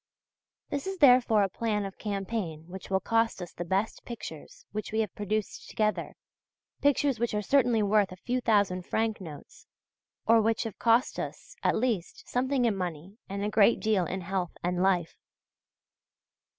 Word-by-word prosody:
This 285 +4 -2
is 385 0 -3
therefore 250 - +6
a - - +2
plan 210 +1 -1
of 195 - -8
campaign 195 -6 -3
which 190 +1 -9
will 190 -1 +2
cost 225 +1 +1
us 175 -2 -7
the 175 - -5
best 195 +5 -1
pictures - - -9
which 215 0 -4
we 220 +1 +1
have 215 - -3
produced 210 0 -3
together, 215 -1 -1 0.7
pictures 285 -3 +2
which 235 -2 0
are 210 - +1
certainly 245 -3 +3
worth 205 -1 +3
a - - -7
few 250 +7 -2
thousand 200 -5 +2
franc 220 -2 0
notes, 155 -5 -11 0.6
or 225 0 +6
which 225 +1 +1
have 225 -4 -7
cost 235 +3 +3
us, - - -6
at - - +2
least, 225 -7 -2
something 260 0 +1
in 225 -3 +2
money 180 +3 -5
and 200 +1 -3
a - - 0
great 210 +1 +4
deal 210 -6 +1
in 190 +1 -3
health 180 -1 -3
and 180 +1 0
life. 180 -3 +1
215 Hz, 170 wpm, -29 LUFS, 190-230 Hz, 0.7 s, therefore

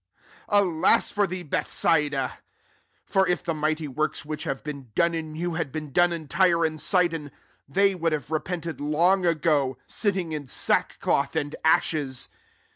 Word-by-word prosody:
Alas 190 -6 +3
for 205 -1 +1
thee» 185 0 -5
Bethsaidai 150 -2 0 0.8
fer^if 185 -3 +2
thia^ 165 -2 -2
mighty 155 0 -1
works 150 +3 -2
which 150 0 -5
have 135 -1 -3
been 140 -3 -6
6om» 170 0 +3
in 160 -2 -4
you 175 +1 -2
had 165 -4 -2
been 155 0 -5
done 175 +5 +4
m 165 -3 -5
Tyre 170 0 +3
and 155 -1 -3
Sidon, 165 -3 +1 0.4
they 195 +7 +3
would 165 -2 -1
have 150 -2 -3
repented 165 0 -3
'long 175 +5 +3
ago, 150 -6 +1
nttingin 175 -8 -1
8a6kok>th 140 +3 0
and 145 -1 -5
ashes. 150 -4 +1
160 Hz, 145 wpm, -25 LUFS, 150-175 Hz, 0.8 s, done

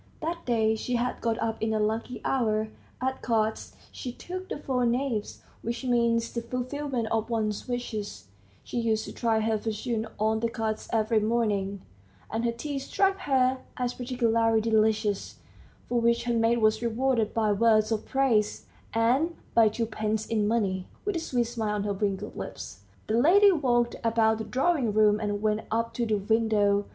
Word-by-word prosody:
That 335 0 -4
day 220 -2 +2
she 245 +3 -2
had 245 +1 -1
got 230 -1 0
up 225 -1 -2
in 220 0 0
a - - +1
lucky 220 +3 -2
hour; 220 -4 +1 0.3
at 260 +1 -2
cards 220 -2 -1 0.2
she 250 - -6
took 370 +8 -7
the - - -3
four 260 -4 -1
knaves, 240 -2 -1 0.2
which 235 +3 -4
means 235 -2 +1
the 235 - -2
fulfilment 250 0 -3
of 225 0 0
one's 215 -2 -1
wishes 215 - -4 0.4
(she 240 - -3
used 220 -2 0
to - - -8
try 225 -2 +1
her 220 0 +1
fortune 225 +1 -2
on 220 +1 +1
the 230 +1 0
cards 220 -1 -3
every 220 0 +2
morning), 210 -3 0 0.5
and 225 +2 -1
her 235 - +2
tea 275 +4 -4
struck 390 +8 +1
her 265 -6 +2 0.2
as 250 -1 -1
particularly 230 -3 +1
delicious, 215 -2 +1 0.5
for 240 -1 +1
which 235 0 +2
her 240 - 0
maid 230 +1 +3
was 215 +1 +3
rewarded 235 -1 +1
by 220 -2 +1
words 215 +1 +3
of 220 -1 0
praise, 245 -6 +1 0.3
and 260 +9 +2 0.2
by 225 -2 +6
twopence 220 -1 -2
in 215 -2 0
money. 195 -5 0 0.2
With 410 -2 -1
a - - 0
sweet 250 -6 0
smile 225 -3 -2
on 205 - -1
her 205 -1 -1
wrinkled 195 -1 -2
lips, 95 - -7 0.2
the 220 +2 +1
lady 395 +7 +7
walked 240 -7 +1
about 225 -1 +2
the 220 - -4
drawing 265 -4 +1
room 210 0 +4
and 205 -1 -2
went 215 0 +1
up 230 +1 -1
to 235 -1 -1
the 215 - +2
window. 205 -1 +2
230 Hz, 175 wpm, -27 LUFS, 215-245 Hz, 0.5 s, lady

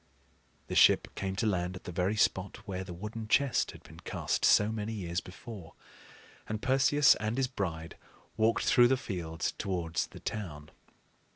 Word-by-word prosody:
The - - -6
ship - - +5
came 95 -1 -3
to 110 - -1
land 90 -3 0
at 90 - -10
the - - -6
very 90 +4 0
spot 100 -2 0
where 95 -1 -3
the 95 - -9
wooden 105 +5 -6
chest 135 +1 +2
had - - -11
been - - -14
cast - - -2
so 105 +1 +5
many 110 0 -3
years 90 -4 -3
before; 95 -2 -10 0.7
and 110 0 -2
Perseus 135 +3 +4
and 110 +3 -2
his 135 -1 +2
bride 85 - -4 0.4
walked 110 +1 +2
through 120 -1 +6
the 130 +1 +2
fields 85 -8 -3
towards 85 -4 -2
the - - -12
town. 80 -8 -6
100 Hz, 170 wpm, -31 LUFS, 90-110 Hz, 0.7 s, through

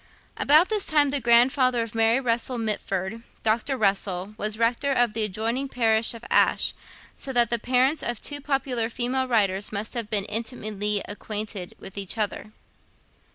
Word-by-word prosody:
About 310 +5 +4
this 425 -3 +2
time, 295 -2 +2
the 285 - +1
grandfather 245 +1 +4
of 230 - -7
Mary 225 +2 +3
Russell 240 0 -1
Mitford, 210 -1 -3 0.2
Dr. 230 +5 0
Russell, 195 -2 0
was 215 0 -2
Rector 235 +5 +1
of 245 -4 +2
the 225 - -2
adjoining 225 +7 -2
parish 225 -2 +2
of 230 - -11
Ashe; - - +3 0.4
so 270 - -4
that 240 -2 +3
the 235 - +1
parents 260 +6 +2
of 240 -3 -3
two 290 -1 -4
popular 265 -5 -1
female 255 +2 -1
writers 200 -5 +1
must 215 +1 -4
have 235 -4 -4
been 205 -2 +1
intimately 210 -2 -1
acquainted 205 -2 -5
with 195 +1 -9
each 195 +3 -6
other. 210 0 -3
230 Hz, 160 wpm, -25 LUFS, 210-255 Hz, 0.4 s, About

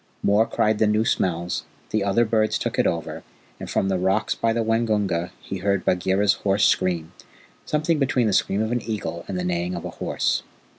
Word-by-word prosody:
Mor 105 +3 +3
cried 110 0 +1
the 110 - +4
new 105 +1 +2
smells, 85 -3 0 0.3
the 110 -2 +1
other 100 +4 +2
birds 110 -1 +1
took - - -3
it - - +4
over, 85 -1 -3 0.4
and - - -7
from 95 - 0
the 95 -1 0
rocks 95 +4 +1
by 115 - 0
the 115 0 0
Waingunga 105 -6 0
he 95 - -6
heard 100 0 0
Bagheera's 95 +3 +2
hoarse 100 0 +2
scream 85 -3 +1 0.6
something 155 +1 +1
between 130 -3 +2
the 105 - +1
scream 100 +2 +1
of 110 - -2
an 120 -1 0
eagle 105 -6 -4
and 95 - -3
the 90 - -2
neighing 90 0 -1
of 85 - -6
a - - -5
horse. - - -1
100 Hz, 200 wpm, -23 LUFS, 90-110 Hz, 0.6 s, the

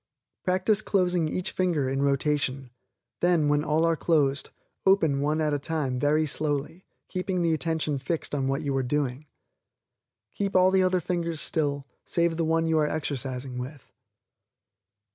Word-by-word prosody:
Practice 190 +3 +2
closing 180 -6 +1
each 180 +3 -1
finger 170 -7 0
in 135 +1 -1
rotation; 140 -2 0 0.5
then, 170 -4 +3
when 145 0 +2
all 160 +1 +2
are 165 0 +2
closed, 145 -4 +1 0.3
open 160 -8 +3
one 150 +2 0
at 155 -1 +1
a 145 - 0
time 140 -4 -2
very 150 +3 +2
slowly, 150 +3 -2 0.2
keeping 185 -1 -2
the 165 -1 +2
attention 160 -3 -1
fixed 155 +4 -3
on 135 -2 0
what 135 +3 -1
you 140 -2 -1
are 135 - +2
doing. 135 +1 -2 1.1
Keep 200 -1 -2
all 185 0 +5
the 190 0 +4
other 185 -1 +2
fingers 170 -2 -2
still, 145 -3 -1 0.2
save 170 -1 0
the 165 - 0
one 165 +1 +1
you 160 -1 +2
are 150 - +2
exercising 130 -4 -3
with. 135 +3 -9
155 Hz, 160 wpm, -27 LUFS, 140-170 Hz, 1.1 s, all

